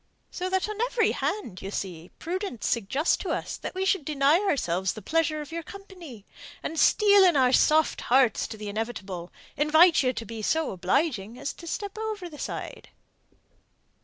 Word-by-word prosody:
So 365 +1 -3
that 380 +1 0
on 425 +1 -4
every 480 -1 +2
hand, 235 - -3
you 195 - -5
see, 180 -4 -5
prudence 360 - -4
suggests 235 - +1
to - - -5
us - - -2
that - - -7
we 380 +1 -1
should 385 -4 +1
deny 290 +2 +3
ourselves 190 - 0
the 215 - -9
pleasure 310 - 0
of 300 +1 -9
your 335 +1 -4
company, 345 - -12 0.4
and, 320 - -3
steeling 400 -5 +5
our 255 -2 +4
soft 310 +3 +3
hearts 255 -1 +3
to 220 - -8
the 210 0 -7
inevitable, 200 -5 -5 0.2
invite 315 +4 +5
you 255 -2 +2
to 230 -2 -6
be 225 +1 -7
so 320 +8 0
obliging 205 - -1
as 280 - -4
to 335 - -12
step 405 +5 -5
over 430 -5 -4
the 295 - -11
side." - - -6
300 Hz, 175 wpm, -26 LUFS, 220-370 Hz, 0.4 s, steeling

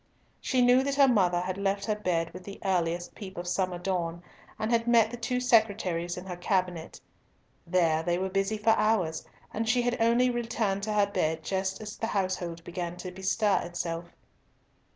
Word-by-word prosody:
She 255 -2 +1
knew 250 +1 +6
that 275 +1 -1
her 280 -1 +6
mother 185 -8 +3
had 185 +1 -3
left 200 0 0
her 215 - +1
bed 170 -5 -1
with 185 +1 -9
the 200 +1 -9
earliest 175 -2 0
peep 195 -2 -9
of 175 0 -5
summer 180 0 -1
dawn, 175 -2 -2 0.3
and 215 +1 -2
had 230 0 +2
met 230 -2 +5
the - - -4
two 250 +1 -1
secretaries 200 -8 +1
in 180 - -7
her 180 -2 -5
cabinet. 180 -2 -2 0.7
There 165 -3 +2
they 175 +1 0
were 190 +1 -1
busy 195 +3 0
for 215 +2 +3
hours, 215 -7 +1 0.3
and 225 +1 -1
she 245 +1 +3
had 245 -1 -1
only 240 +2 +4
returned 230 -4 -1
to - - 0
her 205 -1 +4
bed 160 -5 -1
just 190 +2 -2
as 210 -1 -7
the 225 - -2
household 185 -5 -2
began 175 0 -5
to 185 0 -6
bestir 190 +3 +1
itself. 170 -1 -4
190 Hz, 190 wpm, -28 LUFS, 175-225 Hz, 0.7 s, knew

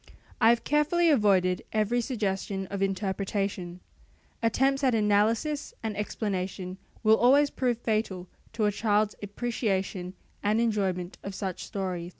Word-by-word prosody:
I 225 - +7
have 235 0 +3
carefully 310 +3 +3
avoided 190 -8 +3
every 220 +3 +1
suggestion 200 -5 -2
of 200 -1 -3
interpretation. 195 -2 -2 0.6
Attempts 270 +4 +2
at 255 -3 +3
analysis 220 +8 +1
and 220 -2 -2
explanation 190 -3 -3 0.2
will 220 0 +6
always 280 +4 +5
prove 245 -3 0
fatal 215 -6 -2 0.3
to 220 - 0
a 210 - +3
child's 210 0 +1
appreciation 195 -4 -2 0.3
and 210 +2 +2
enjoyment 195 -6 -1
of 195 -1 -6
such 190 -3 -4
stories. 180 -3 -4
210 Hz, 130 wpm, -28 LUFS, 190-235 Hz, 0.6 s, I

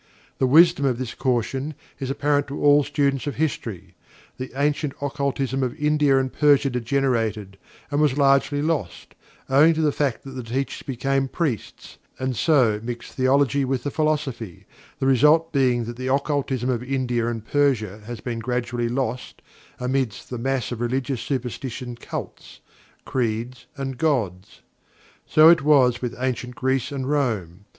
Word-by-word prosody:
The 130 - +3
wisdom 165 +2 +6
of 130 -3 +1
this 125 -2 -4
caution 130 +3 -1 0.2
is 135 - -4
apparent 145 +1 +1
to 140 - -6
all 145 0 +5
students 140 -1 0
of 145 - -3
history. 110 - -3 0.4
The 130 0 -6
ancient 145 0 0
occultism 135 -2 -2
of 130 0 -1
India 150 -2 +3
and 130 -1 -1
Persia 145 -2 +4
degenerated, 115 -5 -1 0.4
and 145 +1 +1
was 145 -3 +2
largely 140 +1 +3
lost, 150 - -3 0.3
owing 150 +5 +5
to 160 - 0
the 150 -2 +3
fact 140 -4 -1
that 135 - -9
the 130 -1 -6
teachers 125 +4 -3
became 135 +1 -1
priests, 135 - -4 0.2
and 130 -1 -2
so 125 -8 +3
mixed 120 0 -6
theology 140 +1 +2
with 130 -2 -1
the 145 - -2
philosophy, 140 - -2 0.3
the 135 - -2
result 150 +5 +4
being 125 -4 +2
that 120 +1 -7
the 130 +1 -4
occultism 140 -3 0
of 120 -2 -1
India 125 -3 -1
and 115 -2 -4
Persia 110 -9 0
has 120 -3 -6
been 120 -2 -4
gradually 120 0 -2
lost 130 0 -3 0.4
amidst 125 -3 -2
the 125 - -4
mass 130 0 -1
of 120 -1 -4
religious 130 +1 -1
superstition, 125 -1 -4
cults, 120 - -8 0.5
creeds 120 +1 -3
and 135 -2 -5
"gods." 105 - -1 0.7
So 155 +1 +6
it 170 -2 +6
was 130 -4 +4
with 125 -1 -3
Ancient 125 -1 -3
Greece 130 +2 -1
and 135 -2 -3
Rome. 105 - -1
130 Hz, 155 wpm, -23 LUFS, 120-140 Hz, 0.7 s, wisdom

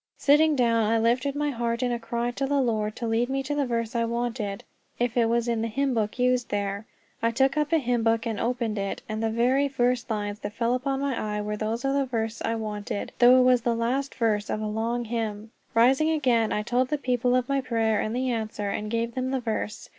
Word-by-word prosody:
Sitting 300 +2 +4
down, 230 -4 +2
I 230 - +3
lifted 245 +5 +1
my 295 0 0
heart 235 -1 -2
in 245 - 0
a 240 - -1
cry 235 +1 -2
to 270 +2 -2
the 285 0 +1
Lord 215 -4 0
to 235 - -4
lead 230 +2 +1
me 270 0 -1
to 280 +2 -3
the 285 -2 0
verse 230 -1 -2
I 230 - +2
wanted, 230 -3 -3 0.3
if 240 -1 -1
it 230 -2 +3
was 235 0 +1
in 230 -2 0
the 225 - -1
hymn 270 +4 0
book 215 -1 -1
used 250 -1 +1
there. 200 +1 -2 0.3
I 230 - +2
took 265 +4 +2
up 300 -1 0
a 330 - +5
hymn 245 -5 0
book 225 0 +1
and 225 -3 -2
opened 230 -3 -1
it, 195 0 -4
and 215 0 -3
the 225 - +1
very 250 +5 +2
first 250 -3 0
lines 205 -1 -3
my 205 - -2
eyes 205 - -22
fell 240 +2 0
on 260 -7 -1
were 210 0 -2
those 220 +4 -3
of 270 - +1
the 280 -1 +1
verse 225 -2 -3
I 230 - 0
wanted, 210 -2 -4
though 250 +1 +7
it - - +5
was 250 -1 +4
the 235 0 0
last 255 +4 -1
verse 215 -3 0
of - - -1
a 215 - -3
long 230 +3 -2
hymn. 220 -1 -4 0.2
Rising 265 +7 +4
again, 250 -8 +2
I 210 - 0
told 245 +3 +1
the 300 - -1
people 250 -2 +1
of 250 -1 +1
my 275 -1 +1
prayer 225 -4 +1
and 215 +2 -2
the 255 0 0
answer, 215 -3 -3
and 210 +1 -3
gave 230 +1 -1
them 255 +1 -2
the 265 0 0
verse. 220 -3 -4
235 Hz, 245 wpm, -26 LUFS, 220-255 Hz, 0.3 s, though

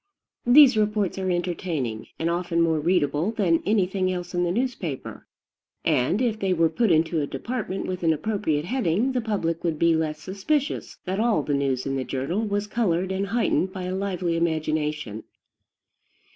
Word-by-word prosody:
These 265 -1 +8
reports 210 -3 0
are 190 -1 -1
entertaining, 170 -10 -2
and 165 - -1
often 170 0 0
more 165 -2 +3
readable 155 0 +1
than 190 -7 +1
anything 190 -2 +1
else 180 0 -5
in 175 0 +1
the 175 - +1
newspaper; 205 - -3 0.6
and, 150 - +2
if 220 -3 0
they 195 -2 +1
were 165 -2 +3
put 225 +7 +1
into 160 -1 +2
a 145 - -2
department 225 - -4
with 185 -1 -4
an 165 -2 +3
appropriate 160 -3 -1
heading, 230 +1 +1
the 255 -1 0
public 190 -7 -2
would 165 -3 0
be 170 +1 +3
less 155 -1 -1
suspicious 200 - -2
that 190 +2 -2
all 220 -9 +2
the 145 - -1
news 135 -2 0
in 135 -1 -1
the 130 - -1
journal 135 +11 -2
was 205 -2 -1
colored 190 -5 0
and 195 +1 -1
heightened 200 -3 +1
by 185 - -5
a 180 +1 -3
lively 185 -3 -1
imagination. 155 -7 -1
180 Hz, 170 wpm, -25 LUFS, 160-205 Hz, 0.6 s, These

